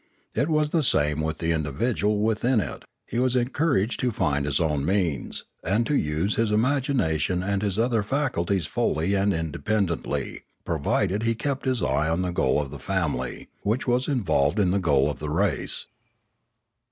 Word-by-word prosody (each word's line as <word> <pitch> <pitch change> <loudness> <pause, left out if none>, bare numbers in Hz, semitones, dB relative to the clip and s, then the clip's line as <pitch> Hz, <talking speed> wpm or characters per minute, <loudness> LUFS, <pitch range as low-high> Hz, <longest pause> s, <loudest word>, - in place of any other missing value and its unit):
It 140 +8 0
was 150 -1 +1
the 165 - +2
same 75 - +2
with 80 0 -2
the 80 0 -1
individual 105 - 0
within 110 +3 +2
it; - - -5 0.2
he 120 - -3
was 130 0 +2
encouraged 125 -2 +1
to 125 - +1
find 75 -10 0
his 70 -1 +2
own 75 -4 0
means, 85 -5 -1 0.2
and 105 +6 +1
to 150 - -1
use 80 - 0
his 115 -2 +1
imagination 110 - +1
and 100 0 -1
his 100 -2 -1
other 115 -1 +2
faculties 100 - 0
fully 80 +6 0
and 100 +1 +2
independently, 85 +3 -2 0.2
provided 90 +5 0
he 115 0 +1
kept 140 +4 -3
his 130 -3 0
eye 75 +2 +1
on 85 +3 0
the 90 -1 -2
goal 65 -4 +2
of 70 -2 -4
the 70 - -8
family, 90 +1 -2
which 110 +5 -1
was 125 +1 +1
in 130 -6 0
volved 75 0 +2
in 95 -4 +3
the 100 - +2
goal 70 -7 +3
of 75 - -3
the 75 - -4
race. 80 - 0
100 Hz, 175 wpm, -25 LUFS, 80-120 Hz, 0.2 s, in